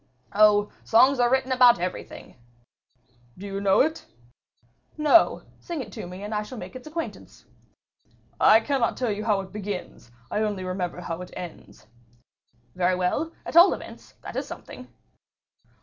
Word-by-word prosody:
"Oh! 210 Hz, 0 st, +4 dB
songs 255 Hz, +4 st, +4 dB
are 240 Hz, -1 st, +4 dB
written 265 Hz, 0 st, +1 dB
about 250 Hz, -2 st, +6 dB
everything." 180 Hz, +1 st, -6 dB, 1.0 s
"Do 195 Hz, -, -9 dB
you 195 Hz, 0 st, -4 dB
know 195 Hz, -1 st, +4 dB
it?" 315 Hz, +3 st, -1 dB, 0.9 s
"No: 305 Hz, +2 st, +4 dB, 0.2 s
sing 340 Hz, -3 st, -6 dB
it 225 Hz, -6 st, -7 dB
to 175 Hz, -, -7 dB
me 180 Hz, +2 st, -9 dB
and 210 Hz, +1 st, -5 dB
I 210 Hz, -, 0 dB
shall 240 Hz, +4 st, -9 dB
make 185 Hz, 0 st, -9 dB
its 255 Hz, +3 st, -9 dB
acquaintance." 325 Hz, +2 st, -7 dB, 0.9 s
"I 220 Hz, +1 st, +6 dB
cannot 260 Hz, -1 st, 0 dB
tell 245 Hz, -4 st, -1 dB
you 210 Hz, +1 st, -4 dB
how 210 Hz, -3 st, +2 dB
it 190 Hz, -1 st, -11 dB
begins; 200 Hz, -, -6 dB, 0.2 s
I 210 Hz, -, 0 dB
only 205 Hz, -3 st, -2 dB
remember 185 Hz, -1 st, -4 dB
how 170 Hz, 0 st, -5 dB
it 180 Hz, -, -8 dB
ends." 170 Hz, -10 st, -10 dB, 0.9 s
"Very 180 Hz, 0 st, +1 dB
well, 185 Hz, -, -1 dB
at -, -, -7 dB
all 345 Hz, +3 st, +8 dB
events, -, -, -13 dB
that -, -, -8 dB
is -, -, -3 dB
something." -, -, -10 dB
210 Hz, 160 wpm, -25 LUFS, 185-255 Hz, 1.0 s, all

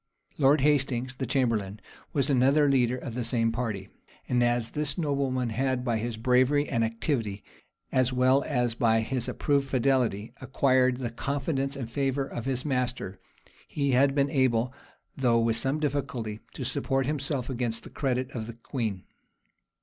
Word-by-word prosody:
Lord 140 Hz, +1 st, +5 dB
Hastings, 135 Hz, -3 st, +1 dB
the 130 Hz, 0 st, -4 dB
chamberlain, 110 Hz, -6 st, 0 dB, 0.3 s
was 140 Hz, -3 st, +1 dB
another 140 Hz, +3 st, +4 dB
leader 125 Hz, -3 st, +2 dB
of 125 Hz, -2 st, -6 dB
the 125 Hz, +1 st, -2 dB
same 115 Hz, -1 st, +1 dB
party; 110 Hz, -5 st, -3 dB, 0.4 s
and 125 Hz, -1 st, +2 dB
as 120 Hz, -1 st, +1 dB
this 150 Hz, -1 st, -2 dB
nobleman 135 Hz, -6 st, 0 dB
had, 130 Hz, +1 st, -1 dB
by 115 Hz, -3 st, +1 dB
his 115 Hz, 0 st, -3 dB
bravery 130 Hz, +5 st, +3 dB
and 115 Hz, -3 st, 0 dB
activity, 115 Hz, -3 st, -2 dB, 0.5 s
as 130 Hz, -1 st, +2 dB
well 130 Hz, +2 st, +3 dB
as 125 Hz, -5 st, 0 dB
by 115 Hz, -1 st, +2 dB
his 120 Hz, +1 st, -2 dB
approved 140 Hz, -2 st, 0 dB
fidelity, 125 Hz, -4 st, +1 dB
acquired 130 Hz, -1 st, +2 dB
the 125 Hz, -3 st, -4 dB
confidence 140 Hz, +2 st, -2 dB
and 130 Hz, -4 st, -5 dB
favor 135 Hz, +1 st, 0 dB
of 120 Hz, -3 st, -6 dB
his 130 Hz, 0 st, -1 dB
master, 125 Hz, -8 st, -2 dB, 0.5 s
he 140 Hz, -2 st, -1 dB
had 135 Hz, +2 st, +4 dB
been 140 Hz, -1 st, +2 dB
able, 130 Hz, -3 st, +2 dB, 0.4 s
though 125 Hz, -3 st, +2 dB
with 115 Hz, -1 st, +2 dB
some 135 Hz, +5 st, 0 dB
difficulty, 130 Hz, -7 st, -2 dB, 0.2 s
to -, -, -4 dB
support 135 Hz, 0 st, 0 dB
himself 140 Hz, -3 st, -1 dB
against 120 Hz, -3 st, -2 dB
the -, -, -11 dB
credit 130 Hz, -1 st, -1 dB
of 110 Hz, -4 st, -5 dB
the 115 Hz, -, -7 dB
queen. 115 Hz, -5 st, -4 dB
130 Hz, 160 wpm, -28 LUFS, 115-135 Hz, 0.5 s, Lord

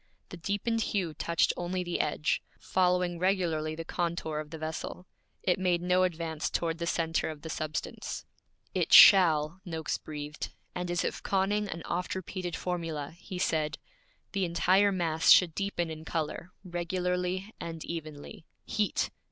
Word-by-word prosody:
The 180 Hz, -, -8 dB
deepened 205 Hz, +6 st, -1 dB
hue 185 Hz, -7 st, -1 dB
touched 170 Hz, +2 st, +1 dB
only 180 Hz, +1 st, -2 dB
the 175 Hz, -1 st, -2 dB
edge, 150 Hz, 0 st, 0 dB, 0.2 s
following 180 Hz, -1 st, +1 dB
regularly 170 Hz, -5 st, +1 dB
the 165 Hz, +1 st, -6 dB
contour 165 Hz, -3 st, -2 dB
of 155 Hz, -1 st, -6 dB
the 160 Hz, -, -7 dB
vessel; 160 Hz, +3 st, -5 dB, 0.4 s
it 180 Hz, +1 st, +2 dB
made 180 Hz, -2 st, +2 dB
no 180 Hz, +1 st, +3 dB
advance 165 Hz, -3 st, -1 dB
toward 165 Hz, -1 st, -1 dB
the 170 Hz, -, -2 dB
centre 165 Hz, -1 st, 0 dB
of 150 Hz, -2 st, -8 dB
the 160 Hz, -, -5 dB
substance. 155 Hz, +1 st, -4 dB, 0.5 s
'It -, -, 0 dB
shall!' 165 Hz, -2 st, +8 dB
Noakes 160 Hz, -4 st, -3 dB
breathed; 150 Hz, 0 st, -6 dB, 0.2 s
and 180 Hz, 0 st, -3 dB
as 175 Hz, -1 st, 0 dB
if -, -, -3 dB
conning 200 Hz, +2 st, +1 dB
an 165 Hz, -1 st, -5 dB
oft 180 Hz, +2 st, -2 dB
repeated 185 Hz, -1 st, -4 dB
formula, 165 Hz, -5 st, -3 dB
he 185 Hz, -, -7 dB
said, 155 Hz, -3 st, 0 dB, 0.5 s
'The 195 Hz, -2 st, 0 dB
entire 185 Hz, +3 st, +3 dB
mass 165 Hz, -4 st, +1 dB
should 175 Hz, -3 st, +7 dB
deepen 175 Hz, -3 st, -2 dB
in 155 Hz, 0 st, -7 dB
color, 160 Hz, +2 st, -3 dB
regularly 180 Hz, +2 st, -2 dB
and 165 Hz, -1 st, -6 dB
evenly. 155 Hz, -2 st, -7 dB, 0.2 s
Heat! 210 Hz, -1 st, 0 dB
175 Hz, 150 wpm, -30 LUFS, 160-185 Hz, 0.5 s, shall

